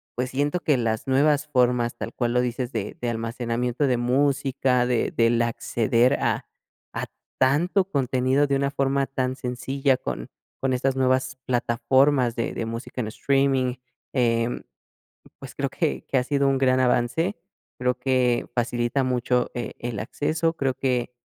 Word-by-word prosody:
pues, 125 +1 -2
siento 145 +6 0
que 145 -4 +2
las 110 -1 -1
nuevas 145 +2 +3
formas, 125 -3 +2
tal - - -5
cual 120 -1 -1
lo 125 - +3
dices, 125 +1 -2
de 110 -3 -4
de 120 - -1
almacenamiento 120 +3 -1
de 125 -2 +2
música, 130 0 +1
de 125 -2 0
del 115 0 +2
acceder 120 +2 +1
a - - 0 0.5
a - - -3 0.3
tanto 170 +9 +3
contenido 130 -1 +1
de 140 - +1
una 140 0 0
forma 135 0 0
tan 130 -1 -2
sencilla 130 +1 0
con - - -5 0.3
con 135 -1 +1
estas 130 +1 0
nuevas 130 0 +1
plataformas 125 +1 +2
de 115 - -2
de 115 - -3
música 115 +2 -5
en 110 - -3
streaming, 135 -1 +1 0.4
em, 115 -2 +1 0.8
pues, - - -10
creo - - -1
que 65 -1 -2
que 135 - +1
ha 125 - +2
sido 140 0 +1
un 135 - +2
gran 130 -1 +3
avance, 130 - +1 0.4
creo 125 0 +2
que 125 -2 +1
facilita 120 +2 0
mucho 125 -1 0
e 120 -2 -4
el 120 -3 -4
acceso, 155 +7 -1
creo 135 -4 0
que, 125 -2 -1
130 Hz, 160 wpm, -24 LUFS, 120-135 Hz, 0.8 s, nuevas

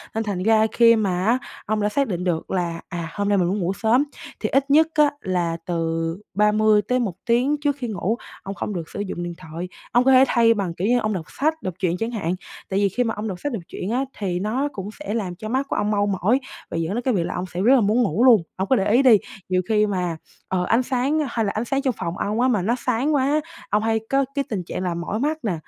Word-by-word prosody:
Nên 225 - 0
thành 195 -4 -3
ra 220 +1 +4
khi 230 -1 +6
mà 190 -4 0
á, 235 +4 +4 0.3
ông 215 +1 0
đã 210 - +2
xác 275 +3 +1
định 180 -3 -3
được 175 -3 -2
là, 170 -3 -2
à, 170 -3 -4
hôm 205 0 -1
nay 205 - +3
mình 180 -2 +2
muốn 200 +3 0
ngủ 180 +1 0
sớm, 230 +6 +2 0.4
thì - - -1
ít 275 +1 +1
nhất 315 +2 +6
á, 300 -1 +5
là 175 -3 -1
từ 165 -1 -1 0.2
30-1 210 +1 +2
tiếng 250 +5 +2
trước 285 -1 +1
khi 255 -4 -5
ngủ, 215 +1 -1 0.3
ông 195 +1 -5
không 210 - -4
được 170 -4 -5
sử - - -7
dụng 185 -3 -4
điện 175 0 -4
thoại. 170 +1 -7 0.2
Ông 245 - +4
có 265 - +4
thể 260 0 +7
thay 230 -1 +4
bằng, 195 -6 -2
kiểu 180 +4 -2
như, 245 +1 +3
ông 215 -2 -1
đọc 170 -5 -4 0.2
sách, 315 +2 +1
đọc 185 - -3
truyện 180 -2 0
chẳng 225 +2 -2
hạn, 185 -6 -2 0.3
tại 195 - 0
vì 200 -1 +3
khi 245 +7 0
mà 225 -2 -1
ông 210 +1 -4
đọc 185 -3 -5
sách, 290 +5 -3
đọc 205 -7 -4
truyện 185 - -5
á, 260 +3 0
thì 180 -4 -2
nó 230 +9 0
cũng 195 0 -5
sẽ 300 -8 -4
làm 195 -6 -2
cho 215 +4 -7
mắt 265 +4 0
của - - -1
ông 210 +1 0
mau 205 -1 +2
mỏi, 200 +6 +2 0.3
và - - -4
dẫn 165 +3 -1
đến 240 - -1
cái 255 -1 +1
việc 180 - +1
là - - -3
ông 180 - -2
sẽ 180 0 -5
rất 245 +7 +6
là 250 - +4
muốn 215 +5 +3
ngủ 225 +2 +1
luôn. 235 -8 +7
Ông 190 +1 -2
cứ 265 - +5
để 200 -3 +1
ý 240 +4 +5
đi, 245 -5 +7 0.3
nhiều 185 0 +2
khi 215 -1 +4
mà, 180 -4 -2 0.3
ờ, 185 -1 0
ánh 230 +7 +2
sáng 265 +4 0
hay 230 -2 -1
là 200 - 0
ánh 215 +3 -2
sáng 275 +2 0
trong 265 -3 0
phòng 170 -1 -4
ông 215 +3 -1
á, 255 - +4
mà 225 -7 +2
nó 225 +7 +1
sáng 255 +5 +1
quá, 285 +3 +2 0.3
ông 210 +1 +1
hay 225 0 +1
có 275 0 +2
cái 280 - +1
tình 195 -5 -2
trạng 180 - -5
là 180 -2 -1
mỏi 170 +5 -3
mắt 300 +4 0
nè, 210 -5 0
210 Hz, 275 wpm, -23 LUFS, 185-245 Hz, 0.4 s, thể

